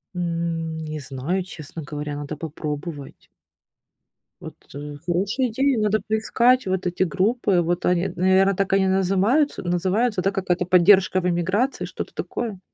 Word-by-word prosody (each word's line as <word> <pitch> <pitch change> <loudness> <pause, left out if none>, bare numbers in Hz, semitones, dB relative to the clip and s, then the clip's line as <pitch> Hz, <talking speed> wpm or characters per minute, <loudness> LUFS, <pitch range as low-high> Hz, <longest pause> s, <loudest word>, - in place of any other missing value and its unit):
М, 165 -2 -2
не 155 0 -4
знаю, 145 +7 -3
честно 160 -2 -9
говоря, 150 0 -5
надо 145 +1 -5
попробовать. 150 -1 -6 1.1
Вот, - - -8 0.2
э, 145 +1 -7
хорошая 200 +9 0
идея, 265 +3 +1
надо 215 0 +2
поискать 235 +3 +2
вот 185 -1 -1
эти 175 +1 0
группы. 195 +2 +1
Вот, 175 +1 -1
они, 180 +1 +2
наверное, 190 +2 +3
так 195 +1 -1
они 195 -1 +3
назымаются 195 +10 +2
называются, 185 +5 0
да, 195 - +1
какая-то 185 -2 -1
"Поддержка 185 +1 +5
в 180 - -1
эмиграции", 190 +9 0
что-то - - -7
такое? 220 -6 -4
185 Hz, 140 wpm, -23 LUFS, 165-200 Hz, 1.1 s, Поддержка